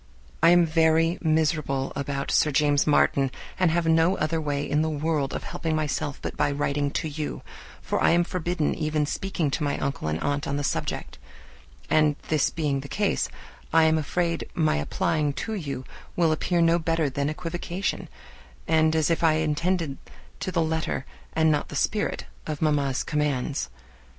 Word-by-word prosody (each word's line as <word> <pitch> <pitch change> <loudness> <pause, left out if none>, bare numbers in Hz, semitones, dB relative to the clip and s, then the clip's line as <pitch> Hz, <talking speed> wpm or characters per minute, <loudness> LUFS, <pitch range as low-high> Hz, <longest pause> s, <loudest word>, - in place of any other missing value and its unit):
I 165 - +7
am 175 0 +6
very 165 +1 +3
miserable 155 -4 0
about 140 0 -3
Sir 150 - +3
James 145 0 +2
Martin, 140 -2 +3 0.3
and 185 -2 +4
have 170 +1 +1
no 165 +3 +3
other 160 +1 0
way 145 -1 -2
in 150 +2 +1
the 160 - +1
world 150 -2 -1
of - - -4
helping 160 -1 -2
myself 145 -2 -2
but - - -4
by - - +1
writing 145 0 0
to 155 - -2
you, 150 0 -5 0.4
for - - -1
I - - +5
am 170 +1 +4
forbidden 175 -2 -1
even 155 -1 0
speaking 165 -2 -2
to 155 - -1
my 145 - 0
uncle 140 - -3
and 75 +1 -1
aunt 145 0 -1
on 140 - -1
the 145 - -2
subject; 130 - -3 0.7
and 155 -1 +3
this 155 -3 +2
being 150 -4 -1
the 140 - -7
case, 205 +6 0 0.4
I 165 0 +5
am 160 0 +4
afraid 170 +2 -1
my 155 - +2
applying 145 - 0
to 220 - -4
you 145 -10 -4 0.3
will 170 -2 +3
appear 170 +2 +1
no 165 +1 +4
better 165 -1 +1
than 140 +2 -1
equivocation, 175 +3 -3 0.6
and 160 0 +3
as 160 +1 +2
if 165 - 0
I 160 -1 +5
attended 155 0 0 0.4
to 185 - -3
the 170 -2 +1
letter 160 -4 -2 0.3
and 160 0 +3
not 150 - 0
the - - -7
spirit 210 +8 -1 0.2
of 155 -2 -3
mamma's 145 -4 +1
commands. 140 - -1
155 Hz, 175 wpm, -26 LUFS, 145-165 Hz, 0.7 s, I